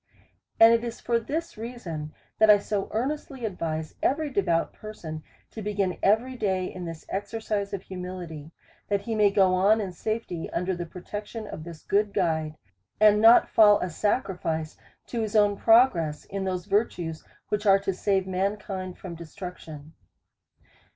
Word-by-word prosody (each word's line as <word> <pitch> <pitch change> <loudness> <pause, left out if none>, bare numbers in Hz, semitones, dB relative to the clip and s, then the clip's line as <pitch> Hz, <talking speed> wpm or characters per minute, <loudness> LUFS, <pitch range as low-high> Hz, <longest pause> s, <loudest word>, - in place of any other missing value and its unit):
And 225 +1 +9
it 230 0 +2
is 235 -1 -5
for 235 -1 +1
this 315 +3 -4
reason, 180 -11 -6 0.3
that 220 0 +6
I 210 - +9
so 200 0 -2
earnestly 265 +1 -3
advise 160 -6 -3
every 295 +1 0
devout 175 -7 +1
person 170 -8 -8 0.3
to 220 - -7
begin 200 -3 -1
every 225 +6 +2
day 190 -5 0
in 180 -1 -6
this 165 -1 -8
exer 200 +3 -3
cise 210 -2 -2
of 195 -2 -4
humility, 180 -5 -7 0.4
that 200 -1 0
he 225 +3 -4
may 210 -2 +4
go 190 -2 +3
on 200 +4 +4
in 195 -3 -3
safety 180 -3 -4
under 180 +1 -1
the 175 -1 -5
protection 205 +5 -7
of 155 -6 -8
his 170 -2 -10
good 205 0 +1
guide, 160 -5 0 0.4
and 210 0 +6
not 230 +2 +7
fall 210 -2 +6
a 180 - -3
sacrifice 175 -6 -1 0.3
to 235 - -3
his 220 -1 -3
own 205 -1 +4
progress 195 - +3
in 195 0 -4
those 185 -2 -2
virtues, 180 -6 -1 0.3
which 210 0 -1
are 195 0 +7
to 195 -1 -2
save 190 0 0
mankind 190 -1 -3
from 185 -3 -8
destruction. 165 -2 -9
195 Hz, 165 wpm, -26 LUFS, 175-215 Hz, 0.4 s, And